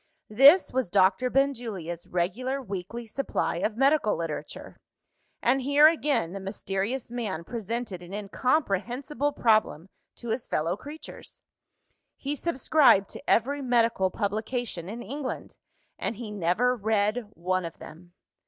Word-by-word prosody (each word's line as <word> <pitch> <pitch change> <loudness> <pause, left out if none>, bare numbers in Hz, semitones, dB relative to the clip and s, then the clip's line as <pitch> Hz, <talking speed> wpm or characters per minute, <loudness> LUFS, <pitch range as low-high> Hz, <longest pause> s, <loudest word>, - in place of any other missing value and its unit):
This 280 - +7
was 255 -6 0
Doctor 195 +5 +3
Benjulia's 225 -12 -1
regular 245 +10 -1
weekly 215 0 -6
supply 245 -6 -2
of 210 +5 -2
medical 275 -4 +3
literature; 165 -3 -6 0.7
and 265 +3 +3
here, 285 +3 +5
again, 285 - +2
the 195 - -5
mysterious 195 +5 -3
man 210 -9 -3
presented 225 -2 -4
an 175 +1 -11
incomprehensible 250 +5 -1
problem 215 - +1 0.3
to 235 - -8
his 230 +2 -2
fellow 165 +3 0
creatures. 295 +9 -11 0.7
He 280 +2 -3
subscribed 275 - +3
to - - -9
every 280 +5 +2
medical 230 -6 +2
publication 215 -2 -3
in 235 +3 -6
England 270 +4 -6 0.4
and - - -2
he 220 -1 -7
never 210 +6 +1
read 215 +1 0
one 185 +2 -1
of 165 -1 -7
them! 175 +3 -13
225 Hz, 125 wpm, -27 LUFS, 190-260 Hz, 0.7 s, This